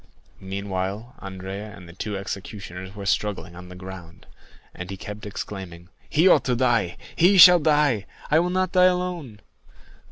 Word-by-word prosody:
Meanwhile 100 +3 -4
Andrea 95 +2 -7
and 90 - -13
the 85 - -12
two 100 +3 -4
executioners 95 -1 -7
were 100 -1 -7
struggling 100 -3 -1
on 90 0 -11
the 90 - -10
ground, 90 -2 -11 0.5
and 90 0 -8
he 95 - -6
kept 105 +1 -8
exclaiming, 95 -4 -7 0.2
"He 165 +5 +4
ought - - +5
to 125 - +1
die!—he 120 - +2
shall 180 0 +10
die!—I 150 -2 +1
will 175 +1 0
not 185 0 0
die 185 -1 +5
alone!" 180 - -1
100 Hz, 150 wpm, -24 LUFS, 95-150 Hz, 0.5 s, shall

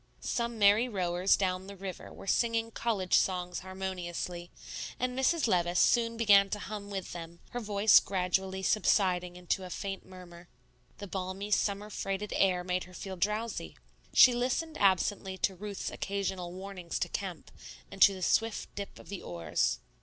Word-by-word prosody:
Some 235 -1 -2
merry 210 +4 +5
rowers 180 -2 +2
down 185 -1 -1
the 200 - -8
river 190 -2 -7
were - - -11
singing 230 +2 +1
college 210 -6 -2
songs 180 -1 +2
harmoniously; 180 -2 -5 0.5
and 250 0 -1
Mrs. 280 +5 +2
Levice 175 -3 +1
soon 230 -1 +3
began 200 -3 +6
to 210 - -2
hum 205 0 -7
with 195 -2 -5
them, 170 0 -8
her 245 - -3
voice 210 -1 +5
gradually 190 0 -1
subsiding 180 -4 +2
into 180 +1 -2
a 185 - -7
faint 195 +1 -5
murmur. 180 -2 -13 0.5
The 205 - -7
balmy, 190 +1 -4
summer 205 +1 0
freighted 195 +1 -3
air 185 -2 +3
made 180 0 -1
her 180 0 -14
feel 190 +2 -6
drowsy. 210 +5 -2 0.3
She 250 - +8
listened 255 +7 -1
absently 190 0 +2
to 190 - +1
Ruth's 200 +2 -5
occasional 190 -3 -3
warnings 185 -2 -6
to - - -1
Kemp, - - -5 0.4
and - - -10
to 200 - +8
the 185 - -6
swift 225 +4 0
dip 200 -1 -7
of - - -14
the 200 -2 -5
oars. 80 -8 -1
195 Hz, 160 wpm, -31 LUFS, 180-210 Hz, 0.5 s, She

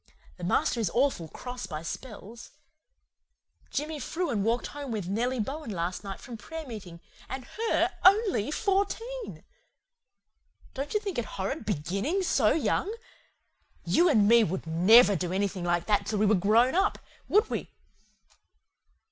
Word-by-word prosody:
The 180 - -10
master 185 +6 +1
is 215 -6 0
awful 250 - +1
cross 250 +8 -7
by 155 -1 -6
spells. 225 +3 -8 1.2
Jimmy 300 +2 -3
Frewen 295 - -2
walked 230 +4 0
home 285 -2 -6
with 210 -6 -3
Nellie 240 +6 -1
Bowan 275 +6 -4
last 180 -1 -3
night 195 -1 -6
from 240 -2 -9
prayer 320 +8 -7
meeting 190 -9 -9 0.3
and 260 0 -5
HER 455 +1 0
ONLY 390 - +4
FOURTEEN. 435 +7 -2 1.3
Don't 280 +8 -4
you - - +4
think 395 - -3
it 235 - -2
horrid 210 +7 -3
BEGINNING 200 - -1
SO 245 -11 +3
YOUNG? 350 +5 0 0.9
YOU 345 +1 +4
AND 215 -9 +4
ME 235 +1 +6
would 190 -2 -3
NEVER 195 +6 +6
do 180 0 -2
anything 195 -1 -1
like 175 0 +1
that 210 -2 +1
till 215 - -1
we 210 - +3
were 210 - +4
GROWN 215 +6 +4
UP, 385 +4 +2 0.3
would 425 +3 +3
we? - - -3
235 Hz, 150 wpm, -28 LUFS, 195-305 Hz, 1.3 s, ME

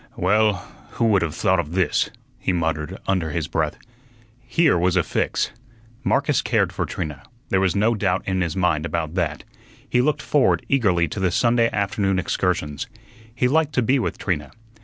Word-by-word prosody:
"Well, 105 0 +2 0.3
who 115 - 0
would 100 -3 +4
have 85 -1 -2
thought 95 -1 +2
of 80 -1 -3
this?" 90 -1 +1 0.3
he - - 0
muttered 80 0 -2
under 95 -5 +1
his 80 0 -2
breath. 80 -2 -1 0.6
Here 125 - +2
was 90 +1 +2
a 90 - +3
fix. - - -1 0.5
Marcus - - +2
cared - - +1
for - - -2
Trina. 75 -6 -5 0.3
There 95 - +2
was 95 0 +1
no 110 +4 +3
doubt 95 -4 0
in 95 -1 0
his 85 0 -1
mind 90 -5 +1
about 85 -2 -2
that. 85 -5 -1 0.4
He 125 - +2
looked 150 +2 0
forward 145 -3 +2
eagerly 95 -11 +2
to 100 - -5
the 95 -1 +2
Sunday 115 +4 +3
afternoon 100 -1 0
excursions. 85 -5 -1 0.5
He 125 +1 +2
liked 155 +2 +2
to 125 - +2
be 130 +4 +3
with - - -2
Trina. 75 -7 -2
95 Hz, 180 wpm, -22 LUFS, 85-110 Hz, 0.6 s, would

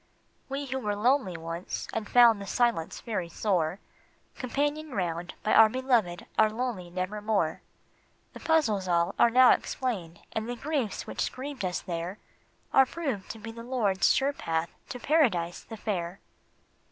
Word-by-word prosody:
We 275 +1 -3
who 265 0 -3
were 210 -4 -1
lonely 215 -4 +2
once 165 +2 -5
and 220 -2 -3
found 235 -4 +6
the 200 - -7
silence 235 -8 0
very 205 -7 -3
sore, 175 -2 0 0.6
Companioned 290 +3 -2
round 175 -2 -2
by 215 - +2
our 220 -1 +8
beloved 235 -8 0
are 215 0 +6
lonely 220 -6 -3
never 185 +4 -3
more; 205 -7 0 0.7
The - - -9
puzzles 225 - +2
all 170 -1 +2
are 235 - +6
now 250 +2 +7
explained, 185 -10 -2
and 220 +1 -3
the 245 - -2
griefs 275 -4 -2
which - - -2
grieved 265 -2 -6
us 180 -1 -1
there 175 +2 -4 0.6
Are 265 -1 +6
proved 265 - -4
to - - -6
be 225 +1 -8
the 230 +1 -9
Lord's 230 -6 +2
sure 275 +2 +2
path 165 -9 -2 0.2
to 250 - -6
Paradise 220 - +2
the 225 - -10
Fair. 185 -3 -3
215 Hz, 160 wpm, -28 LUFS, 180-255 Hz, 0.7 s, our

